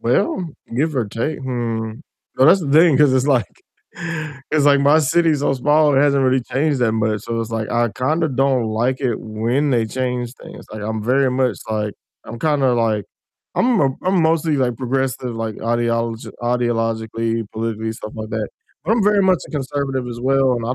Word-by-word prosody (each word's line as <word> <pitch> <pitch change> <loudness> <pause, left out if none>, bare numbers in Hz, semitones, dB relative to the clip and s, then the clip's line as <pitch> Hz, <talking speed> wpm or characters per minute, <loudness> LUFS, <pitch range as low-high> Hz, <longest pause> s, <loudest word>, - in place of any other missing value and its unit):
Well, 190 - 0 0.3
give 150 +5 0
or 120 -4 0
take 115 +9 -3
hmm, 115 -4 -3 0.4
well, 130 +3 +5
that's 190 +4 +6
the 145 -5 -3
thing 160 -1 +6
'cause 150 -3 +5
it's, 130 +1 +2
like 130 -5 +3 1.1
it's, 150 -2 +2
like 140 -1 +5
my 145 +3 +5
city's 160 0 +2
so 140 - +1
small 150 +3 +3
it 135 - +4
hasn't 140 -2 +3
really 130 0 +3
changed 140 +2 0
that 115 -2 +2
much, 110 -2 0
so, 115 0 -3
it's, 115 0 -5
like, 110 -1 -3
I 120 0 +2
kinda 155 +8 0
don't 135 -2 +1
like 120 +5 -1
it 125 -5 -1
when 115 +7 -1
they 120 -3 +2
change 125 0 -3
things, - - -12
like, 110 -1 -6
I'm 110 0 -3
very 130 +3 +2
much, 125 -6 0
like 105 -1 -2 0.3
I'm 115 - -8
kinda, 140 -2 +2
like 110 -3 0 0.5
I'm 240 -4 +2
m 135 -2 +1
I'm 185 0 +2
mostly, 160 -1 +2
like, 125 -3 0
progressive, 130 -1 -2
like, 115 -1 -3
ideolog 115 0 -1
ideologically, 115 -1 -1
politically, 110 0 -3
stuff 110 -1 -8
like 110 0 -6
that, 110 -2 -2 0.4
but 195 - +1
I'm 230 -1 +2
very 205 -1 +4
much 185 -2 +3
a - - -12
conservative 135 -2 -2
as 120 0 -7
well 135 0 +2
and 115 -2 -3
I 125 - -1
125 Hz, 195 wpm, -20 LUFS, 115-145 Hz, 1.1 s, that's